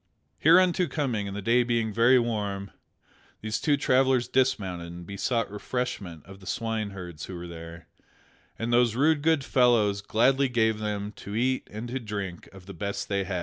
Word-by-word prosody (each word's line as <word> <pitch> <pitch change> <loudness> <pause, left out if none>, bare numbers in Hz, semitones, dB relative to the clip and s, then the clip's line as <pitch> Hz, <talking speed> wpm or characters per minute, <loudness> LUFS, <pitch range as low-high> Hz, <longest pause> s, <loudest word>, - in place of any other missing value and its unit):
Hereunto 180 +2 +5
coming, 125 -8 -2
and 100 0 -5
the 105 - -5
day 120 +4 +4
being 115 -3 0
very 120 +4 +5
warm, 105 -5 -2 0.7
these 110 0 -3
two 145 -2 +2
travellers 130 -2 +2
dismounted 95 -10 0
and 85 0 -9
besought 105 +4 -1
refreshment 105 - -4
of 95 +1 -12
the 95 - -14
swineherds 100 -8 -4
who 95 - -8
were 85 0 -7
there, 85 0 -10 0.7
and 115 +1 -2
those 120 -2 +3
rude 145 +3 +3
good 160 -2 +2
fellows 115 -6 +3
gladly 130 +6 +2
gave 110 -3 +1
them 105 -1 -3
to 100 - -7
eat 130 +3 0
and 110 +3 -6
to 130 +2 -3
drink 100 -6 -5
of 95 -1 -14
the 100 - -9
best 100 +3 -4
they 100 -1 0
had. 95 -1 -2
110 Hz, 175 wpm, -27 LUFS, 100-125 Hz, 0.7 s, Hereunto